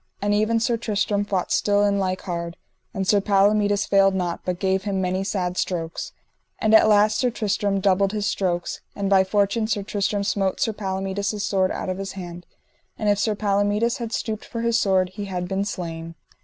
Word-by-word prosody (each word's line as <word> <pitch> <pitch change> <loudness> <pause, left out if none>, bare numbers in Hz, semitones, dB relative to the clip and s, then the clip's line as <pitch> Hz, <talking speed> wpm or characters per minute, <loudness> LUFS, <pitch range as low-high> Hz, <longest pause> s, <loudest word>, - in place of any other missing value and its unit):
And 205 +1 0
ever 215 +2 +2
Sir 235 +1 +1
Tristram 210 -2 0
fought 195 -3 -2
still 205 0 +2
in 200 -1 +2
like 185 -1 -1
hard, 170 -2 -5 0.3
and 190 -1 -3
Sir 205 0 +4
Palomides 205 0 +3
failed 195 -1 +4
not, 175 -2 -2
but 180 -1 -2
gave 190 0 0
him 195 -1 -2
many 185 +1 -1
sad 185 -2 -2
strokes. 165 -3 -3 0.5
And 220 0 +1
at 220 - +9
the - - +2
last 210 0 +4
Sir 250 - +2
Tristram 205 -3 -1
doubled 195 0 +2
his 210 -1 -2
strokes, 175 -4 -1
and 200 -1 -2
by 190 -1 +6
fortune 205 +3 +1
Sir 205 -2 -1
Tristram 200 0 -1
smote 195 -2 0
Sir 225 - +1
Palomides 200 +1 -3
sword 190 -2 +1
out - - -4
of 185 +1 -3
his 195 0 -5
hand, 175 -2 -8 0.5
and 210 - 0
if 205 -1 +2
Sir 215 0 +1
Palomides 205 +4 +1
had 235 -3 -5
stooped 220 -2 -3
for 230 - -5
his 235 -1 +2
sword 185 -2 +2
he 200 +3 -6
had 180 -2 -4
been 195 +2 -1
slain. 165 -4 -5
200 Hz, 200 wpm, -23 LUFS, 190-210 Hz, 0.5 s, at